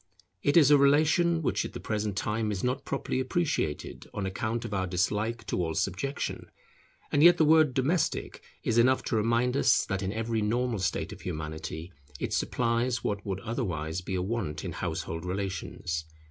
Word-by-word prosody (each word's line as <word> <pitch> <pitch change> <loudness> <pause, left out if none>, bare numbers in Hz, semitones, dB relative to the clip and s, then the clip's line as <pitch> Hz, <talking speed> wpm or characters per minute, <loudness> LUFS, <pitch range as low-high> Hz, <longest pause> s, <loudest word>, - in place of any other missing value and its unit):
It 145 +3 +3
is 150 -3 +7
a 145 - +7
relation 160 +4 +4
which - - +1
at - - -6
the - - -6
present 105 -2 -2
time 110 0 -1
is 95 -3 -3
not 125 +2 -1
properly 135 -1 -2
appreciated 130 - -2
on 100 - -2
account 110 +4 -2
of - - -5
our 95 -1 0
dislike 105 +5 -1
to 90 - -1
all 80 -1 -2
subjection; 135 +10 -2 0.6
and 145 - +3
yet 175 +2 +8
the 160 - +4
word 155 -3 +5
domestic 145 +6 0 0.2
is 115 +1 +2
enough 130 +2 +4
to - - -1
remind 115 +3 +2
us 110 -9 +4
that 95 0 -2
in 95 0 -2
every 115 +1 -1
normal 120 +1 0
state 95 - -1
of - - -12
Humanity, 80 +1 -5 0.3
it - - -2
supplies 120 0 0
what 100 -1 -2
would 95 -1 -3
otherwise 90 - -3
be 95 +1 -4
a 90 - 0
want 95 -8 -3
in - - -3
household 80 0 -4
relations. 90 -3 -3
110 Hz, 180 wpm, -29 LUFS, 95-130 Hz, 0.6 s, yet